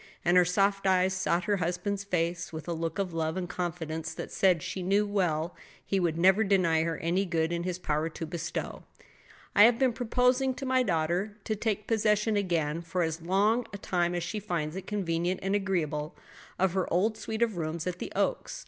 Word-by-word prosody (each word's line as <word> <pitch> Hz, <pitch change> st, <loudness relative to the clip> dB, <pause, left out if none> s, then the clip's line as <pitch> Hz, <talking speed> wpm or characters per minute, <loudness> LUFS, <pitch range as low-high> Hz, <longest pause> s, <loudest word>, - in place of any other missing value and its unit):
And 175 Hz, +1 st, +4 dB
her 180 Hz, -1 st, +6 dB
soft 195 Hz, +2 st, +1 dB
eyes 185 Hz, 0 st, +3 dB
sought 180 Hz, -2 st, 0 dB
her 205 Hz, +2 st, +1 dB
husband's 180 Hz, +3 st, -2 dB
face 175 Hz, -2 st, -1 dB
with 160 Hz, 0 st, -7 dB
a 170 Hz, -, -1 dB
look 165 Hz, -1 st, -3 dB
of 190 Hz, -3 st, -2 dB
love 160 Hz, +1 st, -1 dB
and 180 Hz, -1 st, -2 dB
confidence 165 Hz, -3 st, -4 dB
that -, -, -6 dB
said 180 Hz, -5 st, +3 dB
she 190 Hz, -, -4 dB
well 195 Hz, -4 st, +1 dB
knew -, -, -23 dB, 0.2 s
he 195 Hz, -, 0 dB
would 170 Hz, -3 st, 0 dB
never 190 Hz, +5 st, +5 dB
deny 180 Hz, -6 st, +3 dB
her 165 Hz, -1 st, -1 dB
any 175 Hz, +4 st, 0 dB
good 165 Hz, -3 st, 0 dB
in 170 Hz, 0 st, -1 dB
his 180 Hz, 0 st, -3 dB
power 155 Hz, -2 st, -1 dB
to 165 Hz, -, -6 dB
bestow. 170 Hz, +1 st, -4 dB, 0.7 s
"I 205 Hz, -, +9 dB
have 235 Hz, 0 st, +4 dB
been 260 Hz, -2 st, +2 dB
proposing 250 Hz, +2 st, +1 dB
to 275 Hz, -, -6 dB
my 260 Hz, 0 st, +3 dB
daughter 180 Hz, +1 st, 0 dB
to 215 Hz, -, -1 dB
take 210 Hz, -1 st, -2 dB
possession 215 Hz, -1 st, +2 dB
again, 170 Hz, -5 st, 0 dB
for 170 Hz, +1 st, -1 dB
as 160 Hz, 0 st, -2 dB
long 205 Hz, +7 st, +2 dB
a -, -, -4 dB
time 175 Hz, -2 st, 0 dB
as 175 Hz, -, -1 dB
she 210 Hz, +5 st, -3 dB
finds 170 Hz, -6 st, -3 dB
it 190 Hz, -, -6 dB
convenient 180 Hz, -3 st, -1 dB
and 195 Hz, +1 st, 0 dB
agreeable, 170 Hz, -6 st, -1 dB, 0.4 s
of 190 Hz, -1 st, +2 dB
her 190 Hz, -1 st, -1 dB
old 210 Hz, +6 st, +2 dB
suite 220 Hz, +1 st, -2 dB
of 225 Hz, -4 st, 0 dB
rooms 160 Hz, 0 st, -3 dB
at 180 Hz, -1 st, -3 dB
the -, -, -5 dB
Oaks. -, -, -1 dB
180 Hz, 205 wpm, -29 LUFS, 165-205 Hz, 0.7 s, I